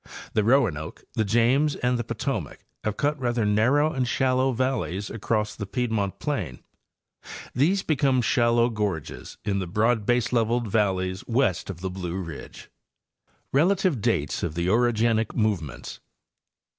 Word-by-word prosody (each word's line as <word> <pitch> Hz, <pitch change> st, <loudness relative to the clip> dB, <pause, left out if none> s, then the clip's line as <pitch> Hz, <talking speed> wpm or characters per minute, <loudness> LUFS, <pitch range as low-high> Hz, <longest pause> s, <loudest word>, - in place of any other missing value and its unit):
The 105 Hz, -, +2 dB
Roanoke, 105 Hz, -, +1 dB
the 110 Hz, -, +1 dB
James 120 Hz, +8 st, +2 dB
and 125 Hz, 0 st, 0 dB
the -, -, -1 dB
Potomac 115 Hz, -2 st, -4 dB, 0.2 s
have 105 Hz, -1 st, -2 dB
cut 145 Hz, +1 st, 0 dB
rather 120 Hz, -3 st, 0 dB
narrow 125 Hz, +9 st, +3 dB
and 130 Hz, -2 st, 0 dB
shallow 130 Hz, +1 st, +2 dB
valleys 120 Hz, -6 st, -2 dB
across 105 Hz, -1 st, -1 dB
the 100 Hz, -, -5 dB
piedmont 110 Hz, -5 st, -1 dB
plain. 95 Hz, -, -3 dB, 0.9 s
These 175 Hz, +10 st, +2 dB
become 135 Hz, -4 st, +2 dB
shallow 120 Hz, +1 st, +3 dB
gorges 105 Hz, -8 st, -4 dB
in 100 Hz, -2 st, 0 dB
the 95 Hz, -, -3 dB
broad 110 Hz, +4 st, +1 dB
baseleveled 120 Hz, -1 st, +1 dB
valleys 95 Hz, -3 st, 0 dB
west 115 Hz, -8 st, +1 dB
of 90 Hz, -3 st, -6 dB
the 95 Hz, -1 st, -3 dB
Blue 90 Hz, -1 st, -4 dB
ridge. 85 Hz, -5 st, -9 dB, 0.8 s
RELATIVE 175 Hz, -, +2 dB
DATES 75 Hz, -6 st, 0 dB
OF 80 Hz, -3 st, -3 dB
THE 85 Hz, +1 st, -1 dB
OROGENIC 115 Hz, 0 st, +2 dB
MOVEMENTS. 100 Hz, -, -2 dB
115 Hz, 135 wpm, -25 LUFS, 100-125 Hz, 0.9 s, narrow